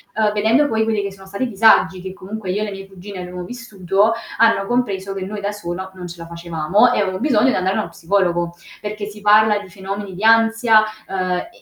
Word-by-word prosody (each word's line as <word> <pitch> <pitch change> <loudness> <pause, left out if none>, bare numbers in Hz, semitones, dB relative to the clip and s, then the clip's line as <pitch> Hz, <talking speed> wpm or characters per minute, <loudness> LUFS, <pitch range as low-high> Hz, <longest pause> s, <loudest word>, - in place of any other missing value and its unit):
Uhm, 215 -1 +2
vedendo 225 +8 +3
poi 220 -3 +1
quelli 220 -2 0
che 200 - -4
sono 195 0 -14
stati 200 +6 -4
i - - 0
disagi 195 -3 +4
che 190 0 -7
comunque 195 +1 -7
io 205 +3 -1
e - - 0
le 205 - -5
mie 195 0 -8
cugine 195 0 -10
abbiamo 180 0 -6
vissuto, 210 -2 0 0.3
hanno 225 -4 +4
compreso 200 -5 -1
che 190 -1 -5
noi 205 +1 -6
da 200 +1 -2
sola 190 -1 -6
non 180 -1 -8
ce 170 0 -9
la 165 0 -9
facevamo 170 +7 +1
e - - 0
avevano 190 -2 -1
bisogno 255 -2 +3
di - - +1
andare 185 +1 0
a - - +1
uno 170 - -6
psicologo. 175 -1 0 0.3
Perché 210 0 -5
si 210 0 -10
parla 210 0 +5
di 205 - -11
fenomeni 195 +1 -6
di 200 - -7
ansia, 225 0 +5 0.2
ehm, 185 -1 -2
e 180 - -2
200 Hz, 230 wpm, -19 LUFS, 185-220 Hz, 0.3 s, parla